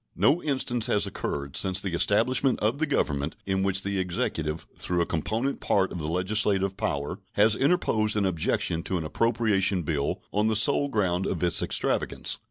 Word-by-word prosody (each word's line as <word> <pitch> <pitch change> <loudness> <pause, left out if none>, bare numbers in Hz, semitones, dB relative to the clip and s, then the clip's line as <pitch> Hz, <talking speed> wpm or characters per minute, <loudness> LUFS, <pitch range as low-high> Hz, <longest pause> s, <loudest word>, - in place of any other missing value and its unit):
No 155 +5 +3
instance 130 -5 0
has 105 - +2
occurred 70 -1 -4
since 95 -1 +2
the 95 -3 -3
establishment 125 +8 +2
of 110 +7 0
the 160 - +1
Government 75 - -1
in 95 0 0
which 95 0 0
the 100 0 -1
Executive, 80 -3 -2 0.2
though 90 -1 0
a - - +2
component 110 - -2
part 95 -1 +1
of 90 - -5
the 75 - -3
legislative 95 +2 +1
power, 70 -4 -3
has 105 +1 +4
interposed 110 -9 +1
an 100 - +2
objection 85 -2 0
to 95 +1 -2
an 80 - -4
appropriation 105 -2 +1
bill 75 -3 -2
on 105 +1 +2
the 110 - +1
sole 140 +6 +3
ground 95 -6 0
of 90 -2 -2
its 85 - +1
extravagance. - - -1
95 Hz, 180 wpm, -26 LUFS, 85-110 Hz, 0.2 s, has